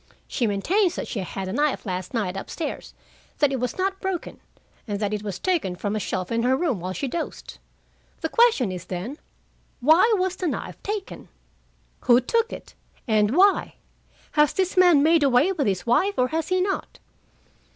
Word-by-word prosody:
She 240 Hz, -, -1 dB
maintains 345 Hz, -, +1 dB
that -, -, -4 dB
she 220 Hz, -, -4 dB
had 190 Hz, +1 st, -5 dB
the 185 Hz, -, -4 dB
knife 290 Hz, +1 st, 0 dB
last 185 Hz, -2 st, -4 dB
night 205 Hz, -6 st, -2 dB
up 195 Hz, -, -6 dB
stairs, 315 Hz, -, -5 dB, 0.4 s
that 290 Hz, -2 st, +3 dB
it 265 Hz, -, -1 dB
was 250 Hz, 0 st, -3 dB
not 385 Hz, +1 st, -1 dB
broken, 380 Hz, -3 st, -4 dB, 0.5 s
and 205 Hz, -2 st, -3 dB
that 210 Hz, 0 st, -1 dB
it 210 Hz, -, -2 dB
was 200 Hz, -3 st, -5 dB
taken 325 Hz, -, -1 dB
from 205 Hz, +3 st, -3 dB
a -, -, 0 dB
shelf 185 Hz, -1 st, -3 dB
in 230 Hz, 0 st, +1 dB
her 255 Hz, +2 st, +2 dB
room 290 Hz, -, 0 dB
while 180 Hz, +2 st, -4 dB
she 275 Hz, +9 st, -3 dB
dozed. 330 Hz, +6 st, -6 dB, 0.6 s
The -, -, -1 dB
question 455 Hz, -, +3 dB
is, 180 Hz, -1 st, -6 dB
then: 200 Hz, -, -5 dB, 0.6 s
Why 320 Hz, -, +5 dB
was 370 Hz, 0 st, -1 dB
the 365 Hz, -, -2 dB
knife -, -, -5 dB
taken? 415 Hz, -1 st, -5 dB, 0.8 s
Who 240 Hz, -1 st, +6 dB
took 460 Hz, -, 0 dB
it? -, -, -9 dB, 0.3 s
And 215 Hz, +4 st, +2 dB
why? 395 Hz, +1 st, +4 dB, 0.6 s
Has 300 Hz, -1 st, +3 dB
this 375 Hz, -1 st, 0 dB
man 355 Hz, -6 st, +6 dB
made 325 Hz, +1 st, +4 dB
away 280 Hz, +5 st, +4 dB
with 300 Hz, -, -1 dB
his 190 Hz, -2 st, -1 dB
wife, 360 Hz, +13 st, +2 dB
or 255 Hz, 0 st, +2 dB
has 320 Hz, 0 st, -2 dB
he 370 Hz, 0 st, +1 dB
not?" 390 Hz, +1 st, -2 dB
270 Hz, 190 wpm, -24 LUFS, -, 0.8 s, Who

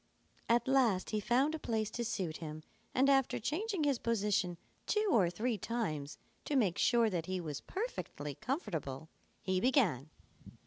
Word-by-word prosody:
At 235 Hz, +2 st, +3 dB
last 245 Hz, -9 st, +3 dB
he 215 Hz, -, +1 dB
found 255 Hz, +8 st, +2 dB
a 320 Hz, -, -3 dB
place 220 Hz, -5 st, -1 dB
to 240 Hz, -, -3 dB
suit 190 Hz, -8 st, -2 dB
him 155 Hz, -1 st, -7 dB, 0.3 s
and 265 Hz, +2 st, +4 dB
after 270 Hz, -2 st, +3 dB
changing 375 Hz, -, -1 dB
his 280 Hz, -4 st, +2 dB
position 205 Hz, -5 st, 0 dB, 0.3 s
two 425 Hz, -1 st, +2 dB
or 190 Hz, -7 st, +4 dB
three 220 Hz, +5 st, -1 dB
times 160 Hz, -11 st, -3 dB, 0.3 s
to 295 Hz, -, -1 dB
make 205 Hz, -10 st, +2 dB
sure 235 Hz, -2 st, +4 dB
that 170 Hz, -3 st, -2 dB
he 185 Hz, 0 st, -1 dB
was 150 Hz, -5 st, -5 dB
perfectly 375 Hz, -, -4 dB
comfortable, 160 Hz, -, -4 dB, 0.3 s
he 185 Hz, -1 st, +1 dB
began. 210 Hz, -, +2 dB
220 Hz, 160 wpm, -34 LUFS, 175-265 Hz, 0.3 s, and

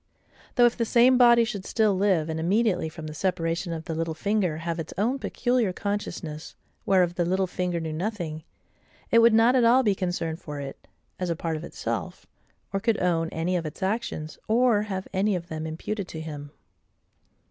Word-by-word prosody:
Though, 245 Hz, -, +6 dB
if 240 Hz, -, +3 dB
the 235 Hz, -, 0 dB
same 245 Hz, +3 st, +5 dB
body 235 Hz, -1 st, +7 dB
should 220 Hz, -4 st, -4 dB
still 215 Hz, -1 st, +2 dB
live, 185 Hz, -5 st, +2 dB
and 160 Hz, 0 st, -3 dB
immediately 185 Hz, -1 st, +1 dB
from 160 Hz, 0 st, -9 dB
the 155 Hz, -, -6 dB
separation 170 Hz, 0 st, -1 dB
of 160 Hz, -1 st, -5 dB
the 165 Hz, -, -3 dB
little 165 Hz, 0 st, -2 dB
finger 195 Hz, -3 st, 0 dB
have 165 Hz, +1 st, -3 dB
its 160 Hz, -, -6 dB
own 240 Hz, +7 st, +1 dB
peculiar 245 Hz, -6 st, 0 dB
consciousness, 180 Hz, -6 st, -4 dB, 0.3 s
whereof 180 Hz, -3 st, +3 dB
the 175 Hz, -, 0 dB
little 190 Hz, +2 st, +1 dB
finger 180 Hz, -1 st, -2 dB
knew 160 Hz, -1 st, -4 dB
nothing, 170 Hz, -3 st, -3 dB, 0.7 s
it 230 Hz, -, +6 dB
would 230 Hz, 0 st, +7 dB
not 230 Hz, +3 st, +5 dB
at 250 Hz, -, +4 dB
all 245 Hz, +3 st, +5 dB
be 210 Hz, -4 st, +3 dB
concerned 175 Hz, -4 st, -3 dB
for 150 Hz, -1 st, -6 dB
it, 140 Hz, -1 st, -8 dB, 0.3 s
as 180 Hz, -1 st, -2 dB
a 170 Hz, -, 0 dB
part 160 Hz, 0 st, -3 dB
of 155 Hz, -, -6 dB
itself, -, -, -5 dB, 0.5 s
or 195 Hz, -, +1 dB
could 225 Hz, +1 st, +1 dB
own 165 Hz, -2 st, +1 dB
any 165 Hz, +3 st, -1 dB
of 170 Hz, -3 st, -1 dB
its 155 Hz, -, -7 dB
actions, 190 Hz, -6 st, -3 dB
or 230 Hz, -1 st, +3 dB
have 190 Hz, -2 st, -4 dB
any 200 Hz, +1 st, +2 dB
of 175 Hz, 0 st, -5 dB
them 160 Hz, 0 st, -4 dB
imputed 185 Hz, +5 st, -4 dB
to 160 Hz, -, -7 dB
him. 150 Hz, -2 st, -7 dB
180 Hz, 195 wpm, -26 LUFS, 160-215 Hz, 0.7 s, body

